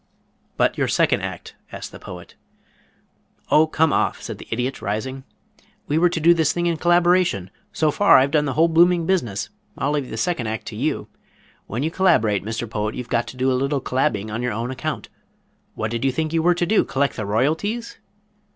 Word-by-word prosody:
"But - - +1
your - - +2
second - - +2
act?" - - -6 0.2
asked - - -7
the - - -11
Poet. - - -10 1.2
"Oh, 155 +1 +5
come 160 -1 +2
off," - - +1
said - - -7
the - - -11
Idiot 125 +3 -2
rising. 130 +7 -4 0.6
"We 150 +2 +1
were 175 +1 +4
to 170 - -2
do 170 +2 +6
this 160 -3 +2
thing 175 0 -2
in 170 -1 +1
collaboration. 175 - +2 0.2
So 155 -1 +1
far 205 +6 +6
I've 135 +2 +3
done 150 -1 +2
the 135 - -2
whole 160 +4 +4
blooming 170 +1 +4
business. 125 - -1 0.3
I'll 140 - 0
leave 145 -3 -2
the 110 - -6
second 125 -2 -1
act 110 -1 -4
to - - -9
you. - - -2 0.6
When 120 +6 -3
you 160 - -1
collaborate, 135 - +2
Mr. 115 +2 -4
Poet, 105 0 -3
you've 125 -2 -6
got 120 -1 0
to 130 - -9
do 130 +1 +1
a - - +2
little 140 +1 0
collabbing 110 -5 -1
on 115 - -2
your 125 -2 -1
own 115 +4 -3
account. 150 +4 -4 0.7
What 110 0 -3
did 115 +1 -3
you 135 - +2
think 155 +4 -2
you 165 - +2
were 175 +2 +3
to 175 - 0
do 215 +5 +3
collect 140 +1 -1
the 110 - -4
royalties?" 160 - -1
140 Hz, 205 wpm, -22 LUFS, 115-165 Hz, 1.2 s, do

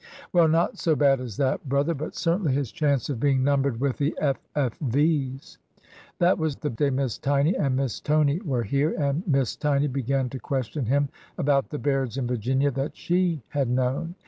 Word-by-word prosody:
" - - -19
Well, 170 -2 +5
not 165 +2 +1
so 160 -2 +2
bad 140 -3 +3
as 120 -6 -7
that, 135 0 -1
brother; 140 +5 +1
but 155 0 -6
certainly 170 -3 +1
his 135 -4 -1
chance 140 -5 0
of 135 -6 -3
being 135 -1 +2
numbered 140 -3 +1
with 135 -1 0
the 145 +1 0
F. 140 -3 +1 0.2
F. 135 -6 0
V.'s. 140 0 -1 0.6
That 175 +1 +3
was 160 -3 -1
the 150 - -4
day 140 +5 +1
Miss 130 -3 -1
Tiny 145 +5 +2
and 135 -3 0
Miss 135 -3 -1
Tony 150 +2 +2
were 130 - -1
here, 140 +8 0
and 145 0 0
Miss 135 -6 +1
Tiny 145 -1 +1
began 135 -1 -1
to 130 - -5
question 130 -1 -3
him 140 +2 +2 0.3
about 140 -1 +1
the 150 - -4
Bairds 135 -5 -1
in 135 - -1
Virginia 130 +4 0
that 135 +3 -4
she 175 -5 0
had 140 -4 -1
known. 130 +7 -1
140 Hz, 200 wpm, -25 LUFS, 130-150 Hz, 0.6 s, Well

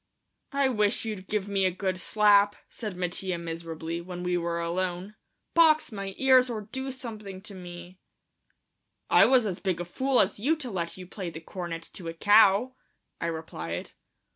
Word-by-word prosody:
"I 280 -1 +3
wish 210 -3 +1
you'd 205 -4 -5
give 210 -2 -1
me 200 -1 0
a - - +4
good 185 0 -2
slap," 205 0 +4
said 210 -6 -6
Mattia 180 0 -1
miserably, 165 0 -5
when 180 0 -7
we 180 0 0
were 170 -1 -1
alone; 180 +3 -2 0.4
"box 315 -4 +5
my 195 -2 -5
ears 260 -1 +5
or 225 -3 -3
do 265 +6 -5
something 215 -7 -8
to 210 - -9
me." 175 0 -10 1.1
"I - - +8
was 255 -3 +4
as 190 -4 -3
big 185 -4 -1
a 175 - -3
fool 260 +8 +1
as 195 +1 +2
you 285 +10 +2
to 270 -6 -6
let 170 -2 -3
you 185 - -8
play 185 0 -6
the 160 - -8
cornet 165 -1 -6
to 175 - -7
a 165 - -5
cow," 205 +6 +5 0.5
I 170 - -2
replied. 90 - -5
190 Hz, 175 wpm, -28 LUFS, 175-215 Hz, 1.1 s, I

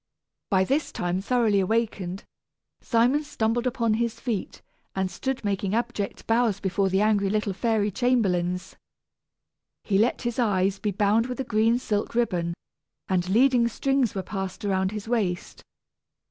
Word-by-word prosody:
By 190 -4 +3
this 275 +10 0
time 180 +1 -2
thoroughly 225 -2 +2
awakened, 195 -2 -1 0.6
Simon 245 +6 +2
stumbled 235 -3 -1
upon 235 -3 +1
his 230 +1 -1
feet, 230 -7 -4 0.3
and 190 -1 -1
stood 265 -4 -3
making 200 0 -1
abject 235 -4 -3
bows 225 -3 +2
before 195 0 0
the 190 +1 +2
angry 210 -2 +2
little 210 -1 0
fairy 215 0 0
chamberlains. 185 -7 0 1.1
He 195 -2 +1
let 230 +4 +1
his 240 +1 -2
eyes 195 -4 +1
be 210 - -1
bound 205 +4 +2
with 250 0 -5
a - - 0
green 225 0 +2
silk 210 -3 -2
ribbon, 175 -8 0 0.5
and 180 -1 0
leading 240 +3 +4
strings 265 -1 0
were 190 - -2
passed 190 +2 -5
around 190 -1 +1
his 210 0 -6
waist. 200 -7 -2
215 Hz, 145 wpm, -26 LUFS, 190-235 Hz, 1.1 s, leading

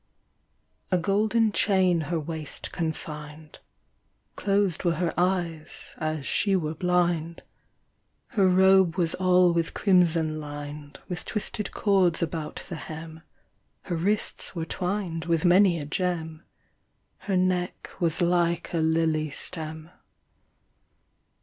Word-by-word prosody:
A 185 - +3
golden 215 +5 +2
chain 185 -4 +2
her 170 -2 0
waist 155 -1 -5
confined, 150 -2 -6 0.8
Closed 195 -3 +1
were 170 -2 +2
her 170 +1 -1
eyes, 175 -3 -2
as 155 -3 -2
she 200 +6 +1
were 155 -4 -1
blind. 170 -1 0 0.9
Her 195 -3 +3
robe 190 -1 +5
was 170 -3 +1
all 180 -1 +4
with 165 -1 -1
crimson 165 -5 +2
lined, 145 -1 -8
With 180 -1 -5
twisted 210 -1 -3
cords 190 -5 +2
about 155 -1 -4
the 170 - -6
hem, 160 +1 -8 0.6
Her 175 - -3
wrists 195 +3 0
were 165 -2 -3
twined 180 -2 -3
with 165 0 +1
many 180 0 +5
a 150 - -5
gem, 160 -1 -3 0.7
Her 195 -2 -1
neck 180 -1 -1
was 165 0 +1
like 170 -1 +1
a 170 - +1
lily 160 -1 +1
stem. 160 +2 -3
170 Hz, 120 wpm, -26 LUFS, 160-185 Hz, 0.9 s, robe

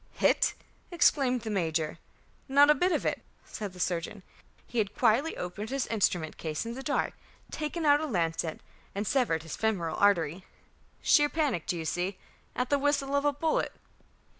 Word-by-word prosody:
"Hit?" - - +2 0.3
exclaimed 270 -7 +3
the 220 -1 -4
major. 160 -5 -1 0.5
"Not 285 +2 +6
a - - +7
bit 360 +4 +1
of - - 0
it," - - -1 0.2
said 205 -3 -6
the 180 - -12
surgeon. 180 +3 -2 0.4
"He 240 - -3
had 205 -2 -1
quietly 250 +7 +2
opened 190 +5 -5
his 275 -1 -1
instrument 180 -7 0
case 155 +5 -3
in 230 - -4
the 265 - -6
dark, 285 +1 -1 0.4
taken 310 +1 -3
out 290 0 +5
a 315 - -2
lancet, 165 - -1 0.3
and 200 +2 -2
severed 230 - +1
his 165 - -6
femoral 190 -8 -1
artery. 180 -3 +2 0.6
Sheer 295 -2 +5
panic, 290 - -1
do 175 - -1
you 165 - -4
see, 180 +4 -2 0.4
at 250 +2 -2
the 285 - +3
whistle 280 -1 +1
of 280 +1 +1
a 290 - +4
bullet." 310 +3 0
220 Hz, 175 wpm, -29 LUFS, 175-285 Hz, 0.6 s, a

